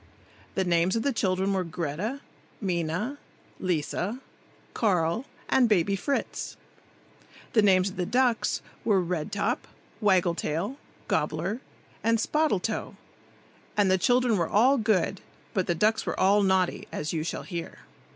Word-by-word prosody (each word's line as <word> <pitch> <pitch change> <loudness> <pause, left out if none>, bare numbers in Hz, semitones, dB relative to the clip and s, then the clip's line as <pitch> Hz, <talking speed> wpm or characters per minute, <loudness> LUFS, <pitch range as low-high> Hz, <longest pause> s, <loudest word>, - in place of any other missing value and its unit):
The 190 - +2
names 175 +1 +2
of 225 - 0
the 280 -1 +1
children 190 -2 +1
were 190 -1 +1
Greta, 175 - -3 0.4
Minna, 185 - -2 0.4
Lisa, 180 +5 -1 0.6
Carl 185 +1 +1 0.2
and 250 -3 +4
Baby 200 -1 +3
Fritz. 280 +8 -2 1.0
The 225 - +5
names 190 -1 +4
of - - -13
the 180 - 0
ducks 245 0 +1 0.2
were 205 -4 +3
Red 175 -3 -2
top, 215 +6 -1 0.3
Waggle 185 -5 +3
tail, 170 - -2 0.3
Gobbler 215 +6 -1 0.4
and 230 +1 +3
Spottle 300 -1 +1
toe; 215 - -3 0.8
and 200 -2 +4
the 190 - +3
children 245 0 +3
were 170 -2 0
all 255 +6 +4
good, 200 -4 +1 0.3
but 190 -2 0
the 175 - +1
ducks 215 +6 +2
were - - -2
all 200 +2 +5
naughty, 190 -2 +1
as 150 +2 -3
you 160 -2 -1
shall 165 - -4
hear. 170 -3 -6
195 Hz, 140 wpm, -27 LUFS, 175-225 Hz, 1.0 s, The